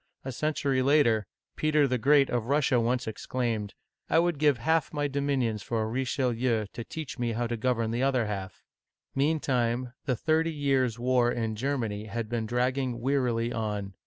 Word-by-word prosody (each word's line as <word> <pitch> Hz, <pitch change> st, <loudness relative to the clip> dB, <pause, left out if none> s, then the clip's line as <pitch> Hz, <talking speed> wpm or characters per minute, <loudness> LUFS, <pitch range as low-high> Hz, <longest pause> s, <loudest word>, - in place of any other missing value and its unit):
A 135 Hz, -, -3 dB
century 140 Hz, -1 st, 0 dB
later, 130 Hz, -7 st, +3 dB, 0.3 s
Peter 150 Hz, -2 st, +3 dB
the 125 Hz, -1 st, 0 dB
Great 140 Hz, +2 st, +4 dB
of 120 Hz, -2 st, -1 dB
Russia 140 Hz, -3 st, +3 dB
once 125 Hz, +2 st, 0 dB
exclaimed, 110 Hz, -1 st, -3 dB, 0.2 s
" -, -, -48 dB
I -, -, +3 dB
would 170 Hz, -3 st, +2 dB
give 145 Hz, -4 st, +4 dB
half 160 Hz, +6 st, +1 dB
my 145 Hz, -1 st, -1 dB
dominions 135 Hz, -6 st, -1 dB
for 115 Hz, +1 st, -1 dB
a -, -, -2 dB
Richelieu 125 Hz, -2 st, 0 dB
to 115 Hz, -, -5 dB
teach 155 Hz, 0 st, -7 dB
me 120 Hz, -1 st, 0 dB
how 120 Hz, +2 st, -1 dB
to 120 Hz, 0 st, -2 dB
govern 115 Hz, -1 st, 0 dB
the 120 Hz, +2 st, -1 dB
other 130 Hz, -3 st, +2 dB
half! 95 Hz, -3 st, -5 dB, 0.3 s
" -, -, -61 dB
Meantime, 130 Hz, -4 st, 0 dB
the 130 Hz, -2 st, +1 dB
Thirty 160 Hz, +5 st, +1 dB
Years' 135 Hz, -5 st, +1 dB
War 120 Hz, 0 st, +2 dB
in 110 Hz, -2 st, -2 dB
Germany 115 Hz, -4 st, -2 dB
had 110 Hz, +1 st, -4 dB
been 115 Hz, -2 st, -2 dB
dragging 125 Hz, +1 st, 0 dB
wearily 120 Hz, -3 st, 0 dB
on. 105 Hz, -3 st, -3 dB
125 Hz, 180 wpm, -28 LUFS, 115-140 Hz, 0.3 s, Great